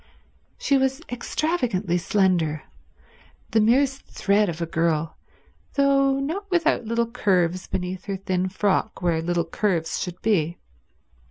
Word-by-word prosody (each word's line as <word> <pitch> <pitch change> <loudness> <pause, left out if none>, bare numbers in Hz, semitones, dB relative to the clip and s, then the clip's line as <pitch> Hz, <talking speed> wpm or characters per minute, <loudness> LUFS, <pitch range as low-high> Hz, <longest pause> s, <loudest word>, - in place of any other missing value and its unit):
She 275 -1 +2
was 265 +3 0
extravagantly 240 - -1
slender— 175 -5 +1 0.9
the 220 - +4
merest 270 +5 +3
thread 200 0 +1
of 165 -1 -5
a 170 - -1
girl, 165 -1 0 0.6
though 275 -1 +3
not 355 +9 -3
without 330 -8 +2
little 230 +1 +1
curves 185 -6 0
beneath 180 0 -4
her 195 -1 -3
thin 185 -1 -1
frock 195 +1 0
where 165 -2 +1
little 170 0 0
curves 165 -2 -1
should 180 -1 -5
be. 175 -6 +1
195 Hz, 125 wpm, -24 LUFS, 175-265 Hz, 0.9 s, the